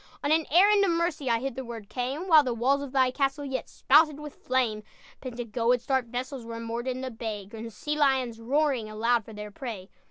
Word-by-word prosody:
On 285 Hz, -, +1 dB
an 320 Hz, 0 st, +3 dB
errand 400 Hz, +5 st, +5 dB
of 395 Hz, -, +2 dB
mercy 335 Hz, -5 st, 0 dB
I 230 Hz, -, +3 dB
hitherward 235 Hz, -4 st, -6 dB
came, 270 Hz, -, -3 dB
While 320 Hz, -4 st, +8 dB
the 250 Hz, -3 st, -2 dB
walls 270 Hz, +5 st, +2 dB
of 280 Hz, -2 st, -6 dB
thy 260 Hz, -2 st, +3 dB
castle 275 Hz, +2 st, -1 dB
Yet 265 Hz, -1 st, -4 dB
spouted 300 Hz, +1 st, +4 dB
with 300 Hz, -1 st, -8 dB
flame. 245 Hz, -5 st, -1 dB, 0.4 s
"Pentagoet's 240 Hz, -1 st, -1 dB
dark 265 Hz, -3 st, +1 dB
vessels 250 Hz, +2 st, -5 dB
Were 230 Hz, 0 st, -7 dB
moored 230 Hz, +2 st, -4 dB
in 255 Hz, 0 st, -2 dB
the 260 Hz, -1 st, -4 dB
bay, 220 Hz, -3 st, -5 dB
Grim 225 Hz, +3 st, -8 dB
sea 295 Hz, +7 st, -4 dB
lions, 265 Hz, -6 st, +1 dB
roaring 260 Hz, -2 st, 0 dB
Aloud 230 Hz, +2 st, +1 dB
for 220 Hz, -, -11 dB
their 210 Hz, 0 st, -7 dB
prey." 205 Hz, -4 st, -7 dB
255 Hz, 200 wpm, -27 LUFS, 230-285 Hz, 0.4 s, While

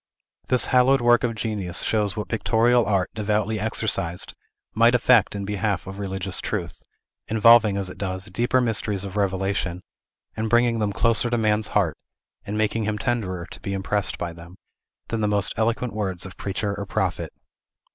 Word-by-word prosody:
This 125 Hz, -1 st, +3 dB
hallowed 130 Hz, +1 st, +4 dB
work 120 Hz, 0 st, +4 dB
of 115 Hz, -2 st, -1 dB
genius 105 Hz, -6 st, -3 dB
shows 105 Hz, -2 st, 0 dB
what 105 Hz, -, -3 dB
pictorial 115 Hz, +1 st, +2 dB
art, 95 Hz, -3 st, 0 dB
devoutly 105 Hz, 0 st, -1 dB
exercised, 105 Hz, -5 st, -1 dB, 0.4 s
might 115 Hz, +2 st, +4 dB
effect 120 Hz, -4 st, +4 dB
in 100 Hz, -1 st, -4 dB
behalf 100 Hz, -1 st, -2 dB
of 95 Hz, +1 st, -8 dB
religious 95 Hz, -2 st, -3 dB
truth; -, -, -4 dB, 0.5 s
involving, 110 Hz, -2 st, +5 dB
as 100 Hz, -1 st, 0 dB
it 90 Hz, -, -10 dB
does, 95 Hz, -1 st, -2 dB
deeper 120 Hz, +6 st, +1 dB
mysteries 105 Hz, -4 st, -1 dB
of 100 Hz, 0 st, -7 dB
revelation, 95 Hz, -2 st, -1 dB, 0.5 s
and 110 Hz, 0 st, -2 dB
bringing 120 Hz, 0 st, +3 dB
them 105 Hz, -1 st, 0 dB
closer 115 Hz, +3 st, +2 dB
to 120 Hz, -, 0 dB
man's 110 Hz, -1 st, +1 dB
heart, 95 Hz, -6 st, +1 dB, 0.5 s
and 105 Hz, +1 st, -4 dB
making 110 Hz, +1 st, 0 dB
him 105 Hz, 0 st, -1 dB
tenderer 105 Hz, -7 st, -2 dB
to -, -, -8 dB
be 100 Hz, -, -4 dB
impressed 100 Hz, +1 st, -1 dB
by 85 Hz, -1 st, -4 dB
them, 85 Hz, +2 st, -13 dB, 0.5 s
than 115 Hz, -1 st, -2 dB
the 105 Hz, -, +1 dB
most 105 Hz, -1 st, +2 dB
eloquent 115 Hz, +2 st, -1 dB
words 95 Hz, -5 st, -3 dB
of 95 Hz, -, -9 dB
preacher 100 Hz, +1 st, -3 dB
or 100 Hz, -1 st, -6 dB
prophet. -, -, -2 dB
105 Hz, 170 wpm, -23 LUFS, 95-115 Hz, 0.5 s, involving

